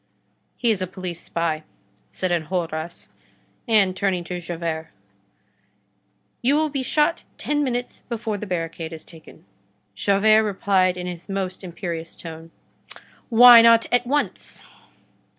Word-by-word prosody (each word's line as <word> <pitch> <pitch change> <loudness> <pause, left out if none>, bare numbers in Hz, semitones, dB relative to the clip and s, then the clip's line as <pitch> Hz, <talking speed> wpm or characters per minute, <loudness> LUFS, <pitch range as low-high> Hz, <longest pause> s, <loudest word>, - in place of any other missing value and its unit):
"He 235 -2 +2
is 200 -4 -1
a 185 - -1
police 180 -2 -7
spy," 165 -2 -2 0.5
said 185 -1 -3
Enjolras. 170 -1 -3 0.6
And 200 -5 +3
turning 190 -2 -1
to 180 +1 -5
Javert: 165 -2 -4 1.5
"You 265 +4 +3
will 310 0 +1
be 275 -2 -2
shot 300 +5 +1
ten 295 0 -1
minutes 245 -2 -3
before 225 -3 -3
the 210 - -6
barricade 165 -2 -4
is 160 - -10
taken." 160 - -16 0.5
Javert 200 - +3
replied 190 -3 +1
in 180 - -5
his 180 +1 -7
most 195 -1 -4
imperious 170 -2 -6
tone:— 165 -1 -10 0.8
"Why 240 0 +9
not 230 0 +6
at 245 0 +2
once?" 290 +3 -2
185 Hz, 130 wpm, -23 LUFS, 170-230 Hz, 1.5 s, Why